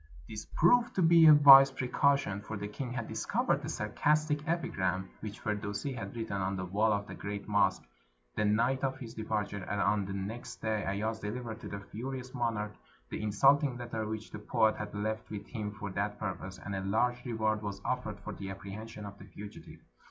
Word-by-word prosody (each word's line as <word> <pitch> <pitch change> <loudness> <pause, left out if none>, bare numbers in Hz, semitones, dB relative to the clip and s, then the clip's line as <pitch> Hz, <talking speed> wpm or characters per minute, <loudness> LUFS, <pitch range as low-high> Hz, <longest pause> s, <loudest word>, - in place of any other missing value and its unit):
This 110 -1 -7
proved 240 +8 +4
to 185 - +2
be 165 -1 +7
a 155 - +11
wise 135 -2 +10
precaution, 130 -5 +1
for 110 +1 -6
the 100 +1 -4
king 120 +4 -5
had 125 - -3
discovered - - 0
a - - -4
sarcastic 150 0 0
epigram 95 - -1
which 105 -1 -7
Firdusi 105 +5 -2
had 100 -3 -6
written 110 -3 -3
on 95 +1 -1
the 95 -1 -3
wall 105 +4 +2
of 100 -1 0
the - - -8
great 100 0 -5
mosque - - +2 0.5
the - - +1
night 115 +6 +2
of 135 -1 0
his 115 -4 -8
departure, 105 -3 -2
and 100 +2 -3
on 100 0 +2
the 95 - -5
next 100 +5 -5
day 110 -1 -1
Ayaz 110 +3 -1
delivered 110 +1 -5
to - - -8
the 100 - -5
furious 125 +4 -6
monarch 115 -4 -1 0.4
the - - -3
insulting 135 +5 +3
letter 115 -3 -4
which 110 0 -5
the - - -6
poet 110 0 +2
had 105 -1 -5
left 110 +1 -3
with 105 -1 -6
him 105 -3 -4
for 105 -1 -6
that 100 +2 -2
purpose, 95 0 -5
and 100 - -6
a 95 - -2
large 120 +5 +1
reward 110 -3 0
was 100 -2 -4
offered 110 -5 -2
for 105 - -6
the 95 0 -6
apprehension 105 +2 -7
of 100 0 -9
the - - -11
fugitive. 105 0 -11
110 Hz, 200 wpm, -31 LUFS, 100-125 Hz, 0.5 s, a